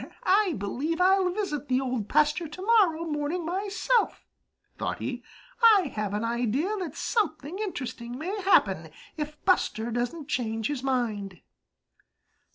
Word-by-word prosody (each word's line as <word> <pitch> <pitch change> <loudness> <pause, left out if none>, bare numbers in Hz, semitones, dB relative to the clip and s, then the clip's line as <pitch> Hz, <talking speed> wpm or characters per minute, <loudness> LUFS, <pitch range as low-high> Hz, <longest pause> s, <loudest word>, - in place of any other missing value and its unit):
"I 385 -1 +3
believe 275 - -2
I'll 375 0 +4
visit 355 -7 -3
the 255 0 +2
Old 250 -6 -2
Pasture 305 +3 +2
to 305 +5 -9
morrow 380 -8 +4
morning 310 +2 -2
myself," 405 +6 0 0.5
thought - - -3
he. - - -4 0.4
"I 415 - +6
have 210 -1 -2
an 210 - -1
idea 240 - 0
that 360 -4 -5
something 360 - -1
interesting 255 - -5
may 380 +8 -3
happen 385 +1 +3 0.3
if 300 -1 -5
Buster 235 - +1
doesn't 245 +6 -3
change 225 -5 -1
his 290 -4 -2
mind." 220 - -2
300 Hz, 135 wpm, -27 LUFS, 245-370 Hz, 0.5 s, I